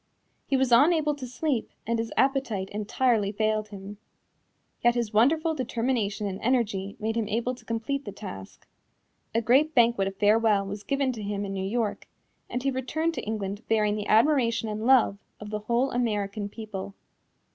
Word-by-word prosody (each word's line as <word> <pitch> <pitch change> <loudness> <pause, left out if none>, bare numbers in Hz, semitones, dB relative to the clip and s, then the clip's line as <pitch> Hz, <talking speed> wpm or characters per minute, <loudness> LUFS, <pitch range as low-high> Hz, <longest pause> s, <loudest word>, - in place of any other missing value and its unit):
He 270 - +2
was 260 -1 +1
unable 300 +4 +5
to 275 -3 -7
sleep 255 -1 -2 0.2
and 230 +1 0
his 225 0 -3
appetite 260 -8 +1
entirely 215 0 +1
failed 215 0 0
him. 200 0 -9 0.8
Yet 240 0 +4
his 235 -3 -2
wonderful 310 +9 +3
determination 235 -6 -1
and 195 -1 -4
energy 215 -5 0
made 220 +1 -2
him 225 -2 -1
able 235 +4 -1
to 250 - -13
complete 230 +5 -3
the 205 - -5
task. 100 - -10 0.7
A 230 - +2
great 285 +7 +3
banquet 235 -5 +4
of 195 - -5
farewell 210 0 +3
was 200 +1 -6
given 275 +3 0
to 230 -3 -7
him 205 0 -3
in 195 - -4
New 190 - -3
York 225 -1 -2 0.4
and 245 +1 -3
he 275 - +1
returned 300 +6 -1
to - - -5
England 205 -1 -3
bearing 210 -2 +2
the 210 -1 -4
admiration 230 -1 +3
and 215 +2 -3
love 250 -6 +4 0.2
of 210 0 -8
the 210 - -2
whole 235 +5 0
American 210 -4 -1
people. 200 -3 -7
225 Hz, 175 wpm, -27 LUFS, 205-255 Hz, 0.8 s, unable